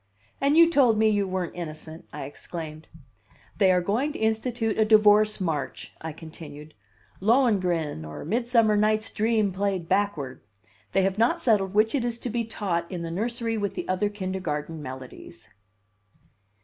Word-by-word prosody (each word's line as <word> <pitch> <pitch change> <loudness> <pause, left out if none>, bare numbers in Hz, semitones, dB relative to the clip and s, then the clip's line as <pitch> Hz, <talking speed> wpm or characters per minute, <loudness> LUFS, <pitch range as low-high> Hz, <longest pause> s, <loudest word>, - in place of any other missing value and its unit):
"And 280 +3 +3
you 335 0 +8
told 270 -9 +4
me 220 0 +4
you 205 -2 +1
weren't 185 -2 -3
innocent!" 160 -1 -8
I 150 - -6
exclaimed. 155 +2 -8 0.7
"They 190 -2 +5
are 180 -1 +3
going 235 +11 0
to - - -6
institute 225 0 -1
a - - +6
divorce 215 0 +5
march," 160 -6 -3
I 160 - -4
continued. 155 -1 -11 0.5
"'Lohengrin' 185 - +2
or 75 - -8
'Midsummer 230 +2 +2
Night's 215 +1 +1
Dream' 215 -2 +1
played 190 -2 -2
backward. 175 -9 -1 0.5
They 195 - +3
have 195 +2 0
not 230 +2 +3
settled 200 -5 +1
which 215 +1 +3
it 275 -4 +1
is 240 -1 -1
to 240 0 -5
be 235 0 -1
taught 180 -6 -2
in 175 -2 -4
the 165 - -4
nursery 230 +4 -2
with 200 -2 -2
the - - -4
other 185 +3 0
kindergarten 185 -6 -4
melodies." 130 -4 -10
200 Hz, 160 wpm, -26 LUFS, 165-220 Hz, 0.7 s, you